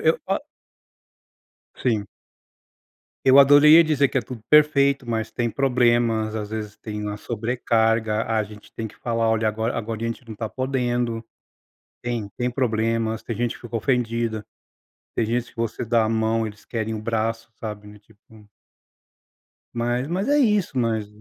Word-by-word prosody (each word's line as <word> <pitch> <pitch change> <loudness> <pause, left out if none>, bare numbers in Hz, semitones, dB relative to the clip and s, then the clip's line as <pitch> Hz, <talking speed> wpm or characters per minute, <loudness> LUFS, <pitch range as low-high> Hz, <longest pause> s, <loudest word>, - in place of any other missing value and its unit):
eu - - -12
só - - +2 1.4
Sim. 110 -5 +1 1.2
Eu 135 +1 +7
adorei 145 +3 +8
a - - +8
dizer 150 -4 +2
que 135 - 0
é - - +1
tudo 120 -4 -9
perfeito 140 -3 +4
mas 110 -1 -2
tem 120 +1 -1
problemas, 120 -4 +2
às 105 -1 -5
vezes 105 -1 -5
tem 105 -1 -6
uma 105 0 -3
sobrecarga, 115 -1 0
a 110 -1 0
gente 105 0 -12
tem 115 - -4
que 110 - -13
falar 115 -1 0
olha 110 0 +2
agora 110 +2 -2
agora 115 0 -4
a - - 0
gente 115 +2 -5
não 115 - -7
está 110 +1 -4
podendo. 120 -3 -1 0.8
Tem 120 -4 -3
tem 125 0 -1
problemas, 115 -2 0
tem 115 - -4
gente 120 +1 -1
que - - -19
fica 120 -1 -4
ofendida, 115 -2 -1 0.7
tem 115 - +1
gente 120 +2 -1
que - - -28
você 115 +1 -2
dá 115 0 +2
a - - 0
mão 110 0 +1
eles 105 -1 -10
querem 110 -1 -3
o 110 - -5
braço 115 0 -2
sabe, 105 -2 -6
não 105 - -12
é - - -15
tipo 105 0 -21 1.3
Mas, 120 +2 -1
mas 185 +7 -1
é 290 +1 +4
isso 210 - +2
nós, 110 -3 0
115 Hz, 170 wpm, -23 LUFS, 110-125 Hz, 1.4 s, adorei